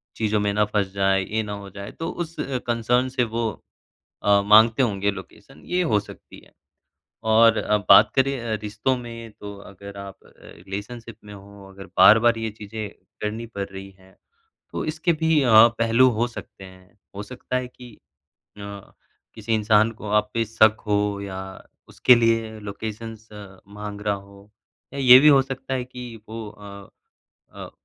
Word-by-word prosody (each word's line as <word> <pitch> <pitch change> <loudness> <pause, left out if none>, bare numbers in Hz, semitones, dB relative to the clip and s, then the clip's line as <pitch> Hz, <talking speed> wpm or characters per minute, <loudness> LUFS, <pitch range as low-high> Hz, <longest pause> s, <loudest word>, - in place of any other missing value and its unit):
चीज़ों 110 -1 0
में 105 0 0
ना 105 +1 +2
फँस 105 -2 -1
जाए, 95 -1 +1
ये 110 +4 -2
ना 105 - -6
हो 100 -1 -8
जाए 100 +1 -9
तो 165 - -6
उस 170 -1 -6 0.3
कंसर्न 120 +2 +1
से 130 -1 0
वो 115 0 -2 0.7
अ, 100 0 +4
माँगते 110 +4 +5
होंगे 100 -3 0
लोकेशन 95 -1 -13
ये 180 0 0
हो 110 -10 +2
सकती 105 - -13
है। - - -23 0.8
और 115 0 +5
अ, 105 - +1
बात 100 +2 +8
करें 135 0 +2
अ, 115 -2 -3
रिश्तों 110 +5 -1
में 115 -1 -9
तो 100 -1 -8 0.2
अगर 100 +1 -12
आप 100 -1 -9
अ, - - -20 0.2
रिलेशनशिप 105 +5 -9
में 105 0 -11
हो 100 0 -14
अगर 95 0 -12
बार-बार 115 +5 +6
ये 110 0 -3
चीज़ें 105 0 -7 0.3
करनी 110 +2 -4
पड़ 100 -4 -5
रही 95 0 -9
हैं, 95 0 -22 0.6
तो - - -4
इसके 160 +2 0
भी 160 -1 +2
अ, 125 - +1 0.3
पहलू 115 +3 +4
हो 120 - +2
सकते 120 -4 -11
हैं। 95 +1 -18 0.2
हो 100 - -5
सकता 125 +3 -7
है 125 0 -4
कि 125 -2 -14 0.7
अ, 100 -1 -10 0.4
किसी 110 +1 -3
इंसान 110 0 +3
को 105 -1 -10
आप 105 0 +1
पे 115 0 +1
शक 110 0 +3
हो 105 -1 0
या 95 -1 -6 0.5
उसके 125 - +5
लिए 115 -2 0
लोकेशंस 110 +2 -8 0.4
माँग 105 0 -7
रहा 105 0 0
हो 100 +1 -14 0.4
या 140 - -7
ये 125 -1 +9
भी 150 - +6
हो 140 -2 +6
सकता 135 0 -6
है 125 -1 -2
कि 125 -2 -10
वो 110 -1 -7
अ 100 -1 -12 0.7
अ, - - -8
110 Hz, 175 wpm, -23 LUFS, 100-120 Hz, 0.8 s, ये